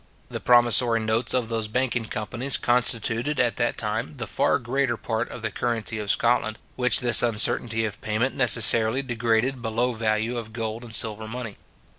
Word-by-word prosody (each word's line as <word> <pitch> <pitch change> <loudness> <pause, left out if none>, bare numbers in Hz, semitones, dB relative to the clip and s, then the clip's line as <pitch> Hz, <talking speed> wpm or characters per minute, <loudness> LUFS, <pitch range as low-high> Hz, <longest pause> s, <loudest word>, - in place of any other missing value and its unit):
The - - -4
promissory 120 -1 +3
notes 110 +2 -1
of 125 -3 0
those 115 -1 -3
banking 120 0 -2
companies 120 +5 -2
constituted, 120 +3 +1
at 120 -2 +1
that 120 -1 -1
time, 110 +6 -4
the 120 - -4
far - - +1
greater 125 0 -2
part 115 +1 -4
of 120 - -10
the 110 - -3
currency 115 -1 -3
of 105 -1 -6
Scotland, 115 -2 0 0.2
which 125 -1 +2
this 120 -1 +6
uncertainty 115 0 +2
of 105 -1 -6
payment 110 +5 -2
necessarily 115 0 +4
degraded 120 +1 -1
below 120 +2 -2
value 110 +1 -2
of 110 -1 -10
gold 110 0 -5
and 115 -2 -1
silver 110 -1 +2
money. 115 -2 -7
115 Hz, 170 wpm, -23 LUFS, 110-125 Hz, 0.2 s, this